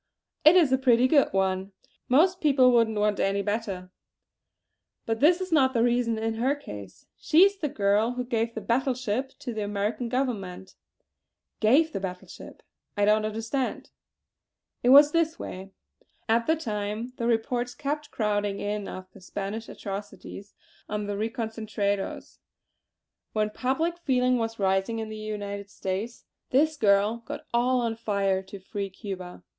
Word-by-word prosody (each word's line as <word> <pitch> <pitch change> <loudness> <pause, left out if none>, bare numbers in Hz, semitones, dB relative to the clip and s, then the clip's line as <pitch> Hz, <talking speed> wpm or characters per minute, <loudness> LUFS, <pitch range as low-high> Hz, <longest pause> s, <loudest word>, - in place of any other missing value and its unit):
"It 310 +4 +8
is 330 -7 +5
a 260 - +3
pretty 250 -1 +4
good 280 +1 +4
one. 190 0 0 0.4
Most 350 +8 +4
people 270 -4 +5
wouldn't 230 -3 +3
want 210 -1 +1
any 200 +1 +1
better. 200 -4 -3 1.1
But 225 0 -1
this 335 +6 +5
is 370 -1 -5
not 265 -5 +3
the 230 - +3
reason 240 -1 +1
in 225 0 -1
her 270 +4 +2
case. 100 - -10
She 320 +4 +5
is 400 0 +3
the 310 -6 -2
girl 210 +2 +1
who 250 0 -3
gave 230 -1 -1
the - - -4
battle 260 +2 +1
ship 255 +2 -3
to 245 - -6
the 215 - -3
American 205 +4 -2
Government!" 195 -8 -3 0.9
"Gave 290 +9 +4
the - - -2
battle 180 -1 -6
ship! - - -12 0.3
I 205 - +3
don't 215 +1 +3
understand!" 225 +5 -3 0.9
"It 245 - +2
was 290 +3 +8
this 330 0 +1
way. 190 +1 -7 0.6
At 230 +1 +2
the 320 - +4
time 215 -3 -4
the 235 - -1
reports 240 +1 0
kept 295 +1 -3
crowding 205 -2 -1
in 205 0 -3
of 185 - -7
the - - -16
Spanish 205 +4 -5
atrocities 200 0 -8 0.3
on 210 0 -2
the 205 - -3
reconcentrados; 220 -2 -3 0.9
when 215 -1 0
public 320 +9 -1
feeling 255 -5 +2
was 225 0 -3
rising 195 +3 +1
in 220 -1 -4
the 215 - -6
United 205 -2 -5
States, 200 +4 -5 0.2
this 310 +4 +3
girl 210 -2 +3
got - - -6
all 250 +1 +2
on 230 -1 -1
fire 200 -4 0
to 190 +1 -10
free 195 +1 -5
Cuba. 185 - -8
225 Hz, 160 wpm, -27 LUFS, 205-255 Hz, 1.1 s, It